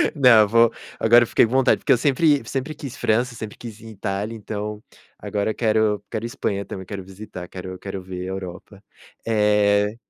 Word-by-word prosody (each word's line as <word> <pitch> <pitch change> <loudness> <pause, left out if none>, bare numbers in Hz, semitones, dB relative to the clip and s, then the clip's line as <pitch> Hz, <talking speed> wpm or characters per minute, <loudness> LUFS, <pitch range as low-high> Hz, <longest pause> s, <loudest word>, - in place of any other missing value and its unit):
Não, 115 -6 +6
vou 115 +2 +4 0.3
agora 120 +2 +6
eu - - -3
fiquei - - +4
com 115 - -6
vontade, 130 0 +3
porque - - 0
eu 130 - +6
sempre 145 +3 +3
sempre 135 +3 -3
quis 140 -4 -8
França, 120 +2 +1
sempre 110 -1 -7
quis 115 -3 -9
ir 115 - -14
em - - -9
Itália 100 +2 -3
então, 105 0 -5 0.3
agora 105 +1 -2
quero 110 -3 +1
quero 110 - -4
Espanha 100 -4 -3
também, 95 -1 -7
quero 100 -1 -6
visitar, 95 -1 -9
quero 95 0 -8
quero 95 0 -6
ver 90 0 -6
Europa, 95 +2 -7 0.4
eh 105 -1 +2
105 Hz, 185 wpm, -22 LUFS, 100-115 Hz, 0.4 s, Não